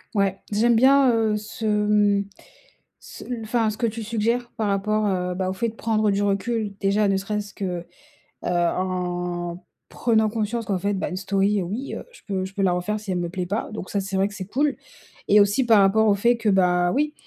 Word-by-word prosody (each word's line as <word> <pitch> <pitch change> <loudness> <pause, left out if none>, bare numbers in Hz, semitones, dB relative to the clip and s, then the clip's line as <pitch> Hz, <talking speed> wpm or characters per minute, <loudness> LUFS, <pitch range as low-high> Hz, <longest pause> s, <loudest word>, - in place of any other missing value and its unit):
Ouais, 195 -1 +1
j'aime 230 +3 +3
bien, 265 +2 +5
heu, 220 -2 +1
ce, 220 +2 -7
mmh, 210 -1 +2 0.8
ce - - -11
l 245 -2 -5
enfin 225 -1 +1
ce 210 - -7
que 235 - +1
tu 225 +1 -4
suggères 230 +2 -1
par 215 - 0
rapport, 210 +2 0
heu, 180 -2 -1
bah, 185 0 -2
au 190 - -2
fait 230 +4 -1
de - - -16
prendre 215 -2 +1
du 200 +1 0
recul. 205 +1 -1
Déjà, 200 +1 +2
ne 195 - +2
serait-ce 205 0 -4
que, 180 -3 -4 0.6
heu, - - -1
en 175 0 -2 0.2
prenant 220 -2 +1
conscience 225 +1 -2
qu'en 195 -1 0
fait, 200 +2 -1
bah, 190 - -2
une 180 - -5
story, 195 +1 +1
heu, - - -2
oui, 215 +10 -5
heu, - - -7
je - - -17
peux 190 -2 -1
je 190 +1 -7
peux 195 - -3
la 185 -2 +3
refaire 210 +4 -2
si 210 -2 -11
elle 180 - -1
me 175 - -2
plaît 180 0 -3
pas, 205 +5 -3
donc 210 -3 -7
ça, 200 - -1
c'est 195 0 -3
vrai 195 +1 +2
que 205 - -10
c'est 190 -2 -6
cool, 280 +5 0 0.5
et 210 - +7
aussi 205 +6 +3
par 225 -3 +6
rapport 215 +3 +4
au 200 - +4
fait 235 +4 +3
que, 230 -2 -1
bah, 180 -2 +3
oui, 300 +2 0
205 Hz, 230 wpm, -23 LUFS, 190-220 Hz, 0.8 s, et